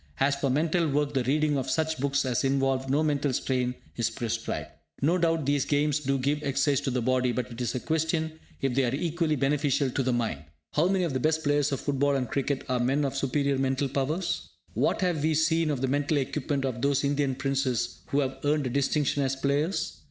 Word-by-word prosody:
As 140 +1 +3
for 140 -1 -1
mental 160 +4 +1
work 145 +1 0
the 130 -2 +1
reading 145 +1 +2
of 130 - -3
such 160 -2 0
books 140 +1 +1
as 125 0 0
involve 135 -1 +1
no 145 +4 +2
mental 145 -2 +1
strain 125 -1 0 0.2
is 115 -1 +1
prescribed. 115 -1 -3 0.3
No 165 +6 +2
doubt 165 -3 +1
these 145 -1 +2
games 150 0 +1
do 135 -1 0
give 140 +3 0
exercise 140 0 +1
to 140 - -2
the 125 -2 -1
body, 130 0 +2
but 125 0 -3
it 120 +1 -7
is 120 - -1
a - - 0
question 160 +1 -1 0.2
if 135 -2 0
they 135 +2 +2
are 125 +1 0
equally 165 0 0
beneficial 140 -1 +1
to 135 - 0
the 130 0 +1
mind. 115 - -1 0.3
How 160 +4 +3
many 190 -1 +1
of 165 -5 -1
the 130 - 0
best 160 +3 +1
players 145 -1 +2
of 135 - -2
football 140 0 +1
and 130 -2 -1
cricket 140 +1 -1
are 125 -1 0
men 135 +4 +1
of 135 0 -2
superior 140 0 0
mental 135 +1 +1
powers? 150 +7 -2 0.2
What - - +1
have 175 -5 +1
we 155 +1 +2
seen 160 +1 +2
of 140 -4 -1
the 135 - +1
mental 145 +3 +1
equipment 140 0 -1
of 125 -3 -3
those 140 0 +2
Indian 140 -1 +1
Princes 135 -3 -1
who 145 - +1
have 135 -1 -3
earned 145 0 +1
a 125 - -2
distinction 140 +1 +1
as 135 -1 0
players? 145 +7 -1
140 Hz, 220 wpm, -27 LUFS, 130-150 Hz, 0.3 s, As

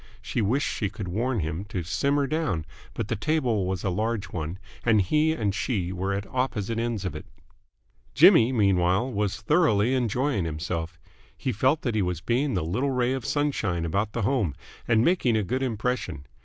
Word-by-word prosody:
She 120 - -2
wished 125 +8 +1
she 105 - -2
could 100 -1 -6
warn 115 +5 -1
him 80 +4 -3
to 95 -3 -4
simmer 140 - +1
down, 135 - -1 0.3
but 115 - -3
the 115 - -1
table 120 -5 0
was 95 -1 -2
a 95 - 0
large 110 +2 -1
one 80 +1 -4 0.3
and 110 -3 +4
he 150 - +2
and 105 -10 -1
she 100 -3 -1
were 95 +2 -2
at 100 +1 -2
opposite 115 -3 -2
ends 115 -4 -2
of 95 - -2
it. - - -8 0.9
Jimmy, 115 +3 +7
meanwhile, 100 +1 +2
was 100 -2 -1
thoroughly 130 - +3
enjoying 125 -2 0
himself. 80 +1 -4 0.4
He 130 - -2
felt 130 +8 +1
that 120 - 0
he 110 - +1
was 90 -3 -1
being 125 +6 0
the 90 - -1
little 120 +12 0
ray 125 -1 +1
of 130 -4 -4
sunshine 110 - 0
about 100 +6 -1
the 120 - -2
home 105 - +1 0.3
and 115 0 +3
making 135 -11 +3
a 110 - +1
good 130 +8 -2
impression. 115 - -2
110 Hz, 185 wpm, -26 LUFS, 95-130 Hz, 0.9 s, Jimmy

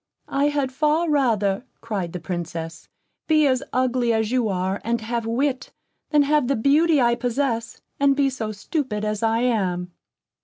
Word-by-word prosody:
"I 275 +1 +2
had 285 -3 0
far 305 +4 +1
rather," 220 -8 +1 0.2
cried 200 -7 -4
the 180 - -5
Princess, 165 -2 -6 0.4
"be 310 -1 +4
as 260 -2 +2
ugly 250 -1 +1
as 220 0 0
you 250 -3 +1
are, 190 +1 -1
and 235 +1 0
have 230 0 -3
wit, 260 +3 -1 0.4
than 295 -1 +4
have 295 -2 +2
the 275 - +1
beauty 295 +6 +3
I 240 -2 +4
possess, 240 -1 -2 0.2
and 280 0 +4
be 280 -1 +2
so 225 -4 -4
stupid 215 0 -3
as 210 -1 -2
I 225 0 +1
am." 185 -7 0
240 Hz, 165 wpm, -23 LUFS, 210-275 Hz, 0.4 s, be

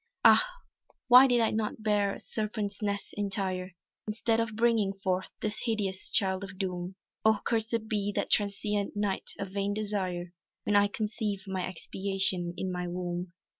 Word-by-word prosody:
"Ah, - - +9 0.7
why 250 +2 +10
did 245 -2 +3
I 225 - +3
not 215 0 -2
bear 205 -2 +2
a - - -10
serpent's 210 -2 -3
nest 200 -1 -2
entire, 195 -2 -2 0.3
Instead 225 +1 +1
of 230 -1 -1
bringing 225 -3 +2
forth 190 -1 -2
this 210 -1 -1
hideous 205 -5 -1
Child 190 0 +4
of 195 -1 -8
Doom! 180 -1 -3 0.3
Oh 220 -1 +5
cursèd 225 -1 0
be 205 -2 0
that - - -1
transient 205 0 0
night 205 -2 -1
of 195 -1 -4
vain 200 +1 -1
desire 185 -5 -3 0.3
When 210 - +1
I 205 0 +6
conceived 210 -1 -3
my 190 -1 -2
expiation 190 -1 -1
in 190 - -2
my 180 0 -3
womb!" 175 0 -4
200 Hz, 160 wpm, -29 LUFS, 190-215 Hz, 0.7 s, why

